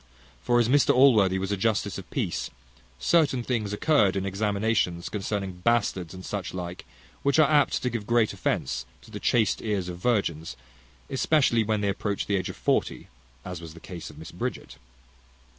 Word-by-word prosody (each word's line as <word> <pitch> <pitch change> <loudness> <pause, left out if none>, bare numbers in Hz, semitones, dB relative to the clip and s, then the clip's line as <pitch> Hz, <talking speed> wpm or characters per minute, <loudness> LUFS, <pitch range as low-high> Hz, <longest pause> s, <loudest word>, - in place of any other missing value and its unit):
For 120 - +2
as 120 - +3
Mr 140 +3 +4
Allworthy 110 -8 +5
was 95 +1 -3
a - - +2
justice 105 +2 0
of - - -12
peace, - - -2 0.5
certain 140 - +2
things 115 -5 -1
occurred 105 -3 +3
in 95 0 -1
examinations 100 -3 0
concerning 95 -3 -4
bastards, 100 -7 +1
and 95 - -9
such 100 -3 -4
like, 90 0 -6 0.4
which 140 +1 +2
are 155 -2 +6
apt 150 -1 +2
to 125 - +1
give 110 -3 -4
great 115 -2 +2
offence 65 0 -2 0.2
to - - -16
the - - -6
chaste 115 -3 +2
ears 100 -5 -2
of 85 -1 -7
virgins, 85 - -1 0.5
especially 130 -4 +3
when 105 -1 0
they 100 - +1
approach 100 +1 -2
the 100 - 0
age 95 - -3
of - - -7
forty, - - -1 0.4
as 90 -2 -6
was 80 -1 -10
the - - -11
case 85 -1 -8
of - - -13
Mrs - - -10
Bridget. - - -5
105 Hz, 180 wpm, -26 LUFS, 90-120 Hz, 0.5 s, are